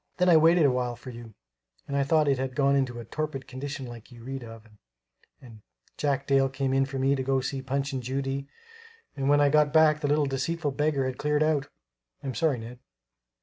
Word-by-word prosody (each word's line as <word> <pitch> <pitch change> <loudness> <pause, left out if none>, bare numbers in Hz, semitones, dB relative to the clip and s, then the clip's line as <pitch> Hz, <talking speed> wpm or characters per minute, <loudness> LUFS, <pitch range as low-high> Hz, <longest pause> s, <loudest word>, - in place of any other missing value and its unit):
Then 180 0 +3
I 170 - +7
waited 165 +1 +5
a 140 - +4
while 125 -1 -1
for 125 +2 -10
you, 115 -3 -11 0.5
and 140 - -3
I 140 - +2
thought 155 +1 +2
it 135 -2 +2
had 130 -1 -3
gone 140 0 +3
into 130 -3 -1
a 115 - -8
torpid 150 0 -4
condition 135 +1 -6
like 120 0 -11
you 120 -1 -13
read 135 +1 -6
of, 115 -1 -11 0.7
and 115 -4 -14 0.3
Jack 140 -1 -1
Dale 135 -1 +3
came 135 0 0
for 135 0 -6
me 135 +1 +2
to 135 - -1
go 135 0 +1
to 130 - -5
see 135 +1 -3
a - - -8
Punch 140 +1 -2
and 130 - -2
Judy 135 +2 -3 0.7
and 135 -1 -1
when 145 0 +5
I 145 - +5
got 150 0 +3
back 155 -1 +5
the 150 - -1
little 145 +1 +2
deceitful 145 +3 -2
beggar 145 -1 0
had 130 -1 -4
cleared 150 0 +1
out! 150 -2 +1 0.6
I'm 135 - -3
awful - - -5
sorry, 155 -6 +2
Ned." 120 +2 -9
135 Hz, 230 wpm, -27 LUFS, 130-145 Hz, 0.7 s, I